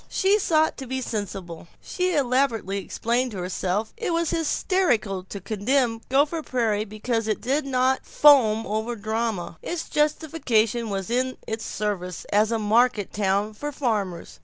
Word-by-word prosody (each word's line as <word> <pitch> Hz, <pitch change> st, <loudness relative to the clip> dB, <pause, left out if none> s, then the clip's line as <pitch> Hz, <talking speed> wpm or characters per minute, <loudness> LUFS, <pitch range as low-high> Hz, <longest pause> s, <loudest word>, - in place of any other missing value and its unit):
She 400 Hz, +2 st, +3 dB
sought 315 Hz, -5 st, +2 dB
to 265 Hz, -, -7 dB
be 260 Hz, +1 st, -2 dB
sensible; 195 Hz, -8 st, -5 dB
she 365 Hz, -1 st, -1 dB
elaborately 245 Hz, -7 st, +1 dB
explained 240 Hz, +5 st, -1 dB
to -, -, -6 dB
herself 185 Hz, +3 st, -2 dB
that 460 Hz, -1 st, -4 dB
it -, -, 0 dB
was 335 Hz, -1 st, 0 dB
hysterical 295 Hz, -, 0 dB
to 200 Hz, +1 st, -7 dB
condemn 225 Hz, +4 st, 0 dB
Gopher 290 Hz, +5 st, +2 dB
Prairie 225 Hz, -7 st, 0 dB
because 220 Hz, +2 st, -2 dB
it 215 Hz, -, 0 dB
did 275 Hz, +3 st, -1 dB
not 260 Hz, 0 st, +1 dB
foam 230 Hz, -7 st, +5 dB
over 220 Hz, +3 st, -2 dB
the 210 Hz, -, -14 dB
drama. 220 Hz, -7 st, -2 dB
Its 345 Hz, -1 st, -4 dB
justification 245 Hz, -7 st, +1 dB
was 195 Hz, 0 st, -3 dB
in 255 Hz, +1 st, 0 dB
its 220 Hz, 0 st, -4 dB
service 180 Hz, -5 st, -3 dB
as 215 Hz, +2 st, +3 dB
a 230 Hz, -, +1 dB
market 220 Hz, 0 st, +2 dB
town 200 Hz, +1 st, 0 dB
for 290 Hz, +7 st, -5 dB
farmers. 210 Hz, -11 st, -3 dB
230 Hz, 160 wpm, -24 LUFS, 205-270 Hz, -, foam